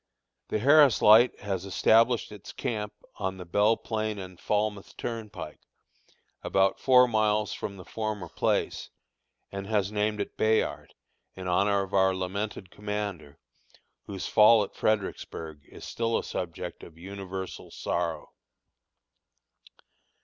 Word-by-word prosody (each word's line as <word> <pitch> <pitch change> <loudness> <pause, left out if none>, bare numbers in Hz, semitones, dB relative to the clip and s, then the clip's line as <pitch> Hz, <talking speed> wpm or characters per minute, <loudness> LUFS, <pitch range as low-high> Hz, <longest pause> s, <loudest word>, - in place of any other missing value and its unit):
The - - -1
Harris 140 +2 +6
Light 110 +4 +6
has 95 -3 -3
established 115 +5 +3
its 105 -2 -10
camp 105 -5 -3 0.3
on 95 -1 -3
the 90 - -8
Belle 105 +6 +3
Plain 110 -1 -3
and 95 -2 -9
Falmouth 105 -1 -2
Turnpike, 105 -9 -6 0.8
about 95 0 +1
four 125 -1 +6
miles 105 -2 +1
from 100 - -6
the 90 - -11
former 110 -5 -4
place, - - -1 0.6
and 100 0 -6
has 105 -2 0
named 105 0 0
it 100 - -4
"Bayard," 110 0 0 0.4
in 95 -1 -7
honor 100 +2 +2
of 95 - -10
our 95 -1 +3
lamented 95 +1 -4
commander, 105 -8 -5 0.7
whose 95 -2 -5
fall 110 0 +6
at 100 - -8
Fredericksburg 80 -7 -2
is - - -11
still 115 0 -1
a - - -3
subject 85 -2 -5
of 80 - -13
universal 95 +1 -7
sorrow. 85 -2 -3
105 Hz, 125 wpm, -28 LUFS, 95-110 Hz, 0.8 s, Harris